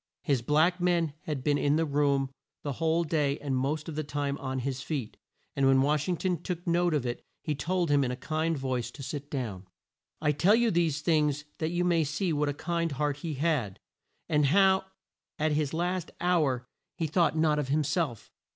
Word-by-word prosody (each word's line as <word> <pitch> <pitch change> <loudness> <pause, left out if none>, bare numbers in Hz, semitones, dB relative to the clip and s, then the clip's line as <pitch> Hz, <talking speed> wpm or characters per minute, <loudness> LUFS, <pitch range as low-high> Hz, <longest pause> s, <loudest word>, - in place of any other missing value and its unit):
His 140 -5 +1
black 160 +8 +2
man 170 -4 +2
had 145 -4 -3
been 145 0 +2
in 145 +1 +2
the 165 +1 +2
room 140 -2 +1 0.3
the 145 - -2
whole 160 +4 +1
day 150 -3 0
and 140 -2 -2
most 145 +5 -1
of 165 - -5
the 155 - -1
time 145 -1 -2
on 130 -1 -3
his 130 0 -3
feet, 130 -5 -4 0.4
and 135 -1 +3
when 135 0 +5
Wash 150 +3 +1
ing 175 - +1
ton 180 -2 -1
took 175 0 -4
note 175 -1 +2
of 140 -4 0
it 120 -1 -3 0.2
he 155 - -1
told 170 +2 0
him 145 -1 +4
in 125 - 0
a 125 - -2
kind 155 +4 -1
voice 130 -3 -2
to 140 - -10
sit 145 +1 -5
down. 105 -9 -4 0.5
I 150 -1 +2
tell 175 +9 +4
you 235 -1 +3
these 165 -4 +1
things 150 -3 +1
that 160 - 0
you 175 +1 0
may 170 -2 +3
see 155 +4 -1
what 150 0 +1
a - - -1
kind 170 0 -1
heart 145 +1 -1
he 155 0 -4
had, 135 - 0 0.5
and 150 -2 +3
how 190 +4 +4 0.5
at 155 +1 +1
his 150 -1 0
last 175 +1 -1
hour 150 -8 +1 0.3
he 165 - -1
thought 160 +1 +2
not 155 -1 +3
of 145 - -2
him 150 +3 +2
self. 145 - -2
150 Hz, 210 wpm, -29 LUFS, 140-165 Hz, 0.5 s, when